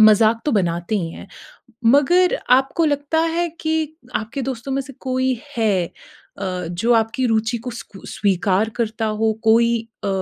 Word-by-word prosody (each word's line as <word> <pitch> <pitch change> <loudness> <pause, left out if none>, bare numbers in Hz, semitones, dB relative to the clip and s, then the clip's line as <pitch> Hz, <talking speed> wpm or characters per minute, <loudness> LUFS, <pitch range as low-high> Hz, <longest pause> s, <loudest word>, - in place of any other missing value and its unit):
मज़ाक 215 +1 +6
तो 295 - +2
बनाते 175 -1 0
ही 165 -2 -3
हैं। - - -11 0.6
मगर 350 +8 +4
आपको 270 +6 +3
लगता 290 +2 0 0.2
है 345 0 +1
कि 315 -1 -1 0.2
आपके 230 +5 -4
दोस्तों 265 +1 -4
में 275 - 0
से 275 +1 -11
कोई 255 -2 -1 0.2
है 205 -6 +2 0.5
अ, 185 -3 -3
जो 225 +8 +1
आपकी 225 +3 +1
रूचि 225 +1 +1
को 250 +2 -6
स्कू 200 -4 -10
स्वीकार 200 +1 +1
करता 225 -1 -1
हो? 220 +1 +1
कोई 230 +1 +5 0.3
अ, - - 0
230 Hz, 160 wpm, -21 LUFS, 215-270 Hz, 0.6 s, मज़ाक